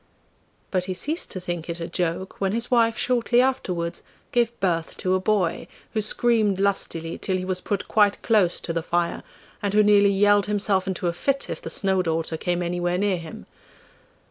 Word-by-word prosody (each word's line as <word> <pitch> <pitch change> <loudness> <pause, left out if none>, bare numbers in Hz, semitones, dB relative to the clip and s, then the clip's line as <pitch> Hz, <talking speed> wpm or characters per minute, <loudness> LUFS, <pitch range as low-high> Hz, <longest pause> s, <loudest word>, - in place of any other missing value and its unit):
But 185 -2 0
he 185 -1 -3
ceased 315 - -2
to 185 - -5
think 175 -2 -5
it 170 0 -4
a 165 - -4
joke 180 +2 -3
when 195 0 +1
his 235 +2 -2
wife 230 -2 +3
shortly 245 -1 +2
afterwards 185 -10 0 0.3
gave 235 -1 +1
birth 165 -4 -1
to 185 - 0
a 185 - +2
boy, 185 -4 0 0.3
who 215 - +1
screamed 215 -2 +2
lustily 170 -4 -1
till 185 - -1
he 185 - -4
was 185 -1 -2
put 200 -1 -3
quite 205 -2 +3
close 205 -6 +3
to 165 - -4
the 165 - -1
fire, 170 +1 -1 0.4
and 205 0 -1
who 210 - +6
nearly 205 -1 +5
yelled 205 +1 +3
himself 200 -2 +1
into 185 -1 -3
a 170 - +1
fit 275 +9 -1
if 165 - -5
the - - -6
Snow 190 +2 +1
daughter 165 -1 -1
came 175 +2 -1
anywhere 175 0 -1
near 200 -1 +1
him. 165 -2 -9
190 Hz, 195 wpm, -24 LUFS, 175-210 Hz, 0.4 s, who